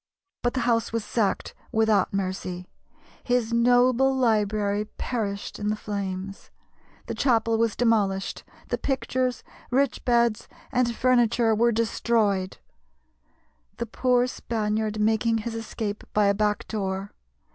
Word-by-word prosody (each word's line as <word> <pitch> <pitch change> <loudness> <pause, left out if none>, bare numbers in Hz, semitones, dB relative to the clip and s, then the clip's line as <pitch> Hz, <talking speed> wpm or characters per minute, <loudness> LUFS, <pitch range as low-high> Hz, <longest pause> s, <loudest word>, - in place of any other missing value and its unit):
But 245 +1 0
the 260 - 0
house 230 -2 +1
was 230 -2 -2
sacked 215 -4 -1 0.2
without 220 -1 +2
mercy; 185 -2 -3 0.6
his 245 -2 0
noble 245 +2 +4
library 210 -4 +1
perished 210 -3 -4
in 210 - -2
the 210 - +1
flames; 195 -2 -5 0.6
the - - -4
chapel 230 -3 +2
was 230 -2 +1
demolished; 205 -5 +1 0.3
the - - -1
pictures, 255 -2 -1 0.3
rich 270 +1 +1
beds, 235 -3 +2 0.2
and 245 -2 +1
furniture 240 -2 +3
were 235 +2 +3
destroyed, 215 -4 0 1.2
the 235 - -2
poor 245 +2 +2
Spaniard 215 -3 -2
making 225 +1 +2
his 225 +1 -4
escape 220 -2 -4
by 210 -1 +4
a 200 - +4
back 210 0 0
door. 195 -2 -3
225 Hz, 125 wpm, -25 LUFS, 205-240 Hz, 1.2 s, noble